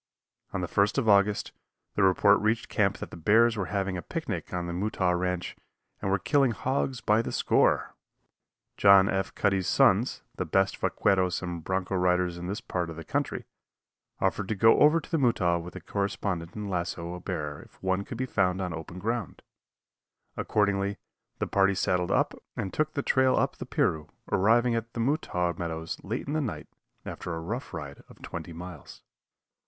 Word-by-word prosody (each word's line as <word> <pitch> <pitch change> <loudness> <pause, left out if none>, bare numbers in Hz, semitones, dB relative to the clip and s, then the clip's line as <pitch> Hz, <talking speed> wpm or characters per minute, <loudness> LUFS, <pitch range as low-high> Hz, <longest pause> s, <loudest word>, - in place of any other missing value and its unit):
On 95 - -2
the 90 - -2
1st 100 +5 +1
of 130 -5 +1
August, 100 0 +3 0.4
the - - 0
report 100 +2 +5
reached 110 +2 0
camp - - +1
that - - -8
the - - -8
bears 110 +7 +4
were 100 -4 -2
having 95 -2 -1
a - - -4
picnic - - -4
on 90 -1 -2
the 85 - -4
Mutaw 95 -1 0
ranch 90 0 -2 0.5
and 95 - -1
were 95 - +3
killing 135 +5 +2
hogs 130 0 -1
by 105 +2 +3
the - - -5
score. - - +2 0.8
John 100 -1 +7
F. 95 0 -1
Cuddy's 95 -3 +1
sons, - - +3
the - - 0
best - - +1
vaqueros 95 -2 +1
and 85 -2 -5
bronco 95 +1 -2
riders 90 -1 +1
in 90 - -5
this 100 +3 -3
part 90 -2 -3
of 80 - -7
the 80 - -7
country, - - -2 0.7
offered 95 +1 0
to 110 - -1
go 110 +4 +5
over 150 +3 +6
to 155 - -13
the 165 - +2
Mutaw 90 -10 +2
with 85 +1 -10
the - - -7
correspondent 100 -4 -3
and 105 -1 -4
lasso 85 -2 -3
a 90 - -6
bear 75 -6 -4
if - - -17
one 95 +1 +1
could 115 - -7
be 130 - -1
found 95 -6 +1
on 90 -3 -2
open 80 +2 -7
ground; 115 +2 -3 0.9
accordingly, 100 -1 0 0.4
the - - -1
party 100 0 +2
saddled 90 -1 0
up - - +2 0.2
and 95 - -3
took 155 0 -1
the 140 - -1
trail 130 -1 +3
up - - 0
the - - -7
Piru, 75 -1 0 0.2
arriving 115 +5 +3
at 115 0 -3
the - - -5
Mutaw 115 - 0
meadows 80 0 -4
late 110 +5 -3
in 145 - -4
the 155 - +1
night, 125 -7 -4 0.4
after 90 - -5
a - - -4
rough 115 +11 -5
ride 70 -2 -7
of - - -16
twenty 85 0 -6
miles. 85 -3 -10
95 Hz, 190 wpm, -28 LUFS, 90-110 Hz, 0.9 s, John